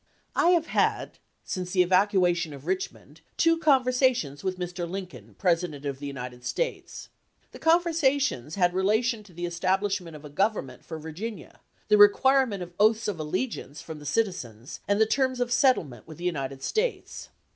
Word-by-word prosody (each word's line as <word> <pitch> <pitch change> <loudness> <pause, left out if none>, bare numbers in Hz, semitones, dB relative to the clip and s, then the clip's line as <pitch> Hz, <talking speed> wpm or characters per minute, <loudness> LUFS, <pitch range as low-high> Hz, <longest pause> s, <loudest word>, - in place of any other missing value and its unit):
I - - +3
have 325 - -3
had, - - 0 0.2
since 180 -1 -4
the 180 -2 +5
evacuation 180 -3 +2
of 140 +1 -13
Richmond, 180 -4 -4 0.2
two 330 0 +3
con 275 -6 +4
versations 250 - +1
with 185 -1 -2
Mr. 175 -1 -4
Lincoln, 135 - -8
President 165 -5 0
of 140 -1 -3
the 145 - -5
United 125 -3 -7
States... - - -4 0.4
The - - -12
conversations 285 - +2
had 175 -2 +2
relation 215 +5 +1
to 205 -3 -17
the 175 +1 -5
establish 190 +3 0
ment 165 -3 -10
of 150 0 -11
a - - -8
government 170 - -1
for 160 - -7
Virginia, 165 +6 -7 0.3
the 210 -1 +4
requirement 225 0 +5
of 175 0 -11
oaths 220 +1 +3
of 200 -6 -3
allegiance 155 - -3
from 160 -2 -8
the 145 - -9
citizens, 135 - -3
and 200 +1 +2
the 220 - +6
terms 260 +2 0
of 245 -1 -1
settlement 165 - +2
with 155 - -10
the 175 - -10
United 135 -6 -3
States. 455 +2 -2
185 Hz, 170 wpm, -27 LUFS, 155-230 Hz, 0.4 s, the